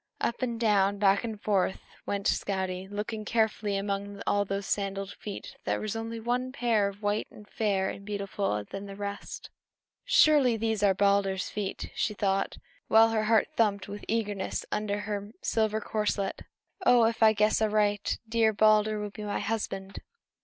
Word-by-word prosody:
Up 235 - -1
and 235 -3 -2
down, 200 -3 +3
back 200 +1 +3
and 220 -3 -5
forth, 195 -3 0 0.2
went 200 -1 -2
Skadi, 190 -1 -1
looking 215 +2 -4
carefully; 215 -2 0
and 195 - -3
among 200 0 -3
all 205 0 +2
those 195 0 -3
sandaled 195 -1 -2
feet 205 -2 -8
there - - -1
was 215 0 -3
one 230 +3 -2
pair 230 -6 +1
more 200 - -17
white 205 0 -1
and 210 - -14
fair 200 -4 0
and 200 - -9
beautiful 200 - -2
than 195 - -7
the 195 - -8
rest. 200 0 -6 0.5
"Surely, 280 -7 +5
these 220 -1 -1
are 200 -2 +4
Balder's 200 -1 +2
feet!" 205 -2 -4
she 210 - -1
thought, 195 -1 0 0.3
while 225 +1 +6
her 220 -1 0
heart 220 0 +3
thumped 205 -3 +1
with 205 +1 -7
eagerness 205 -4 -2
under 205 -1 -1
her 205 0 -5
silver 220 -1 +1
corselet. 210 -3 -2 0.4
"Oh, 245 -1 +6
if 230 0 -1
I 220 -1 +7
guess 215 +1 +2
aright, 210 -1 +1
dear 225 -1 +3
Balder 215 0 +4
will 210 -1 -4
be 210 - -9
my 205 -1 -2
husband!" 195 -3 -3
205 Hz, 165 wpm, -28 LUFS, 200-220 Hz, 0.5 s, I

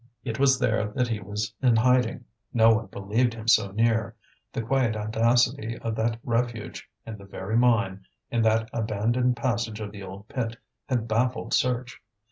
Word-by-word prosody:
It 115 -2 -4
was 135 -1 +5
there 110 -3 +1
that 125 -2 +1
he 110 -2 -1
was 105 +1 -4
in 125 -3 +4
hiding; 125 +1 +2 0.3
no 115 -1 +5
one 110 +1 -1
believed 115 +5 0
him 110 0 -9
so 105 -3 +4
near; 110 +1 +1 0.4
the 115 - -3
quiet 120 -1 +1
audacity 115 +2 +1
of 115 -1 -3
that 110 +1 0
refuge, 115 -2 -2 0.2
in 110 -2 -7
the 100 - -12
very 100 +2 -4
mine, 115 -6 +2 0.2
in 120 - +1
that 110 0 +2
abandoned 115 +3 0
passage 115 -4 -1
of 105 -2 -5
the 100 -1 -10
old 95 +2 -9
pit, 115 -3 -3 0.3
had 120 -3 0
baffled 125 +3 0
search. 125 -1 0
115 Hz, 170 wpm, -26 LUFS, 110-120 Hz, 0.4 s, was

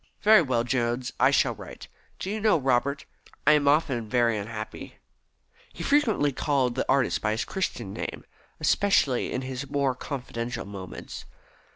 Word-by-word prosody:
Very 215 -2 +7
well, 125 -6 0
Jones. 120 0 -1
I - - +6
shall - - +2
write. - - -11 0.3
Do 190 - -4
you 215 - -2
know, 215 -4 +4
Robert, 135 0 0 0.4
I - - +7
am 150 -1 +3
often 135 -7 +2
very 120 -1 +2
unhappy." 110 +1 -6 0.8
He - - -7
frequently 235 - +2
called 135 -2 0
the 130 - -5
young - - 0
artist 135 - 0
by 105 0 0
his 110 - -2
Christian 120 - -3
name, - - -6 0.3
especially 150 -11 +2
in 130 - -2
his 130 +1 -5
more 140 -2 +1
confidential 125 -2 -5
moments. 100 -2 -8
130 Hz, 160 wpm, -26 LUFS, 120-145 Hz, 0.8 s, Very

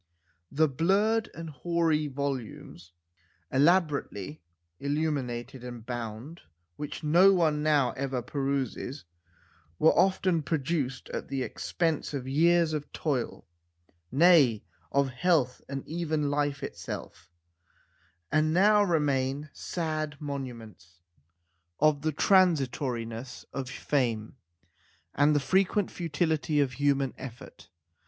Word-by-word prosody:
The 155 +2 +3
blurred 200 - +1
and 165 -1 -7
hoary 160 0 0
volumes, 130 - -5 0.6
elaborately 145 - +1 0.4
illuminated 135 -4 -2
and 120 -2 -8
bound, 120 +6 -6 0.3
which 150 - -6
no 175 +6 +6
one 155 -4 +2
now 145 -5 +3
ever 130 -1 -3
peruses, 140 0 -3 0.7
were 160 - +5
often 185 -2 +2
produced 140 -3 -2
at - - -5
the 135 -1 -2
expense 160 -1 -2
of 130 -2 -4
years 165 +3 +3
of 150 -1 -4
toil 135 -7 -2 0.7
nay, 140 - +5 0.3
of 140 -1 +2
health 130 -2 +1
and 135 -1 -5
even 155 -3 -1
life 145 -1 -1
itself - - -7 1.0
and 155 +1 +2
now 205 +5 +5
remain 145 -5 0
sad 155 -3 -3
monuments 115 - -7 0.8
of 150 -1 +3
the 155 +1 0
transitoriness 130 - +1
of 130 -2 -4
fame 120 -6 -1 0.8
and 145 +2 +3
the - - +4
frequent 190 +6 +1
futility 155 -3 0
of 140 -3 +2
human 140 0 +1
effort. 120 -2 -10
145 Hz, 105 wpm, -28 LUFS, 130-160 Hz, 1.0 s, no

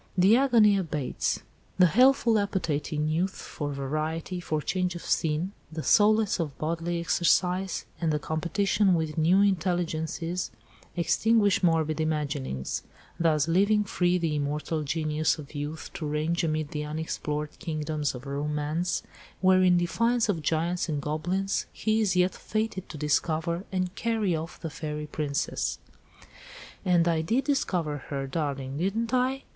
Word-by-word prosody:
The 190 +5 +6
agony 235 -6 +5
abates. 150 -8 -2 0.3
The 180 - +7
healthful 235 - +4
appetite 180 -8 -1
in 150 0 0
youth 175 +5 0
for 145 -1 -5
variety, 155 +6 -3
for 155 -3 -2
change 180 +3 -1
of 175 - -7
scene, 160 +4 0 0.2
the 160 -1 -5
solace 215 -1 +4
of 150 -5 -3
bodily 170 +2 -2
exercise, 180 +2 +1 0.2
and 165 -2 +1
the 150 - +1
competition 180 +5 +1
with 160 -2 -2
new 175 +5 +4
intelligences, 175 -2 -1 0.5
extinguish 200 +4 +3
morbid 160 -3 +2
imaginings: 145 - -2 0.4
thus 155 -3 +2
leaving 200 +5 +3
free 180 -2 +1
the 165 -3 -1
immortal 150 +2 -2
Genius 155 +1 0
of 150 -1 -10
Youth 150 +2 -5
to 155 - -4
range 155 +4 0
amid 155 -2 -1
the 150 -1 -3
unexplored 150 -1 -4
kingdoms 155 -3 -2
of 125 +2 -9
Romance, 150 +4 -2 0.4
where 185 0 +5
in 180 -1 +5
defiance 225 +8 +1
of 170 -6 0
giants 165 +3 0
and 150 -2 -1
goblins, 175 +7 -1
he 220 0 0
is 195 -4 +1
yet 180 +1 +3
fated 215 -3 -3
to 155 - -7
discover 160 +4 0
and 185 -1 -1
carry 220 -4 0
off 160 +2 -6
the 165 - -5
fairy 150 0 -4
princess. 150 -1 -2 1.1
"And 175 -2 +3
I 165 -2 +2
did 230 +12 +1
discover 175 - 0
her, 140 -1 -2
darling, 140 -1 -3
didn't 220 +7 -1
I?" 260 +2 +1
165 Hz, 145 wpm, -27 LUFS, 150-190 Hz, 1.1 s, The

